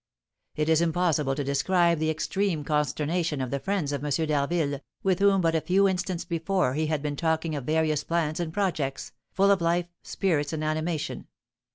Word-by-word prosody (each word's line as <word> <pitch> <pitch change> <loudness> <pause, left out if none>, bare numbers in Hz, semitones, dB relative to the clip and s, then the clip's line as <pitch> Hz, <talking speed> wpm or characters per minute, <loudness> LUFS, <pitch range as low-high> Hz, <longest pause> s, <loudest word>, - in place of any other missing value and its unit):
It 150 0 0
is 160 0 +4
impossible 160 -5 +1
to 145 - -2
describe 170 +4 +2
the 155 0 0
extreme 160 +1 -1
consternation 150 +2 0
of 130 -2 -3
the 140 - -1
friends 190 -4 -1
of 145 -1 -3
M. 150 - -2
d'Harville, 145 0 0 0.2
with 190 -2 +2
whom 200 -1 +4
but 165 -1 +2
a 160 - +1
few 190 +4 +3
instants 185 -2 -2
before 170 -3 0
he 155 +2 0
had 150 -2 -1
been 145 -1 -2
talking 160 0 0
of 140 -4 -4
various 155 -1 +1
plans 165 -1 -1
and 170 -2 -2
projects, 160 -8 -2 0.2
full 195 +1 +3
of 195 -3 +2
life, 170 +1 +1 0.2
spirits, 155 -6 -1
and 155 -1 -2
animation. 155 +1 -2
160 Hz, 185 wpm, -27 LUFS, 150-175 Hz, 0.2 s, is